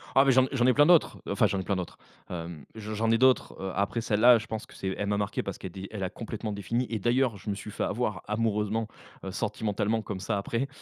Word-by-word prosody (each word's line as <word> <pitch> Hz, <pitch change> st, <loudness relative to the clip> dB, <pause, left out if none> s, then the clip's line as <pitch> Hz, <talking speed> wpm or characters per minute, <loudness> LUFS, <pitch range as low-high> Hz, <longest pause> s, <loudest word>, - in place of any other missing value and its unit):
Ah, 135 Hz, -, +7 dB
mais 135 Hz, -, +5 dB
j'en 130 Hz, 0 st, +5 dB
j'en 125 Hz, -3 st, +2 dB
ai 130 Hz, -, +6 dB
plein 145 Hz, +2 st, +6 dB
d'autres. 170 Hz, 0 st, +5 dB
Heu, -, -, -2 dB
enfin, 100 Hz, +2 st, +3 dB
j'en 100 Hz, -1 st, -1 dB
ai -, -, -3 dB
plein 100 Hz, -, 0 dB
d'autres. 90 Hz, -2 st, -5 dB, 0.3 s
Hem, 85 Hz, -4 st, -6 dB
j 110 Hz, -1 st, -7 dB
j'en 110 Hz, +1 st, +1 dB
ai 115 Hz, -, +4 dB
d'autres, 130 Hz, +1 st, +3 dB
heu, 95 Hz, 0 st, -3 dB
après 100 Hz, +4 st, 0 dB
celle-là, 115 Hz, +3 st, +6 dB
je 110 Hz, -, -6 dB
pense 110 Hz, -1 st, -5 dB
que -, -, -16 dB
c'est 95 Hz, -, -3 dB
elle 100 Hz, -, -2 dB
m'a 105 Hz, 0 st, +1 dB
marqué 100 Hz, -1 st, -1 dB
parce -, -, -5 dB
qu'elle -, -, -7 dB
a -, -, -22 dB
d 95 Hz, 0 st, -7 dB
elle 105 Hz, -3 st, -4 dB
a 95 Hz, -, -1 dB
complètement 110 Hz, -1 st, -5 dB
défini 115 Hz, +5 st, -1 dB
et 110 Hz, -, -2 dB
d'ailleurs, 120 Hz, +1 st, +2 dB
je 100 Hz, -, -7 dB
me 100 Hz, -, 0 dB
suis 105 Hz, -, -8 dB
fait -, -, -3 dB
avoir 105 Hz, -4 st, -1 dB
amoureusement, 105 Hz, 0 st, 0 dB, 0.4 s
heu, -, -, -4 dB
sentimentalement, 105 Hz, +1 st, -1 dB
comme 100 Hz, -2 st, -5 dB
ça 100 Hz, +2 st, -1 dB
après. 115 Hz, +6 st, -1 dB
105 Hz, 270 wpm, -28 LUFS, 100-115 Hz, 0.4 s, Ah